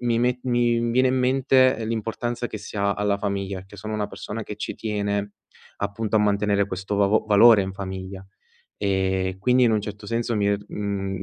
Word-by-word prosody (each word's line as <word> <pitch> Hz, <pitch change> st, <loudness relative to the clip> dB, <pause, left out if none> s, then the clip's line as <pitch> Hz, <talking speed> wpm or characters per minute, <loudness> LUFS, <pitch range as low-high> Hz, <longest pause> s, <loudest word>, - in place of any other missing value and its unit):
mi 120 Hz, -1 st, +1 dB
me 125 Hz, +1 st, +1 dB
mi 120 Hz, -1 st, +2 dB
viene 130 Hz, +2 st, +3 dB
in 130 Hz, +1 st, +1 dB
mente 130 Hz, -1 st, +3 dB
l'importanza 115 Hz, +2 st, -3 dB
che -, -, -6 dB
si -, -, -9 dB
ha 100 Hz, 0 st, +1 dB
alla 105 Hz, 0 st, 0 dB
famiglia, 100 Hz, -1 st, -3 dB
perché 95 Hz, +2 st, -14 dB
sono 110 Hz, +2 st, -5 dB
una 105 Hz, -1 st, -1 dB
persona 110 Hz, +2 st, -6 dB
che 105 Hz, 0 st, -7 dB
ci -, -, -4 dB
tiene, 100 Hz, -1 st, -2 dB, 0.5 s
appunto, 105 Hz, +2 st, -1 dB
a -, -, +5 dB
mantenere 100 Hz, -1 st, +2 dB
questo 95 Hz, +1 st, -4 dB
vav 100 Hz, +2 st, +3 dB
valore 110 Hz, 0 st, +7 dB
in 95 Hz, 0 st, -4 dB
famiglia 95 Hz, 0 st, -7 dB, 0.5 s
e 95 Hz, -1 st, 0 dB
quindi 125 Hz, +6 st, +3 dB
in 120 Hz, -, +4 dB
un 110 Hz, -, +2 dB
certo 105 Hz, 0 st, -8 dB
senso 115 Hz, +1 st, -1 dB
mi 100 Hz, -1 st, +1 dB
è 100 Hz, 0 st, +2 dB
mhmm, 100 Hz, -2 st, -3 dB
105 Hz, 195 wpm, -24 LUFS, 100-115 Hz, 0.5 s, valore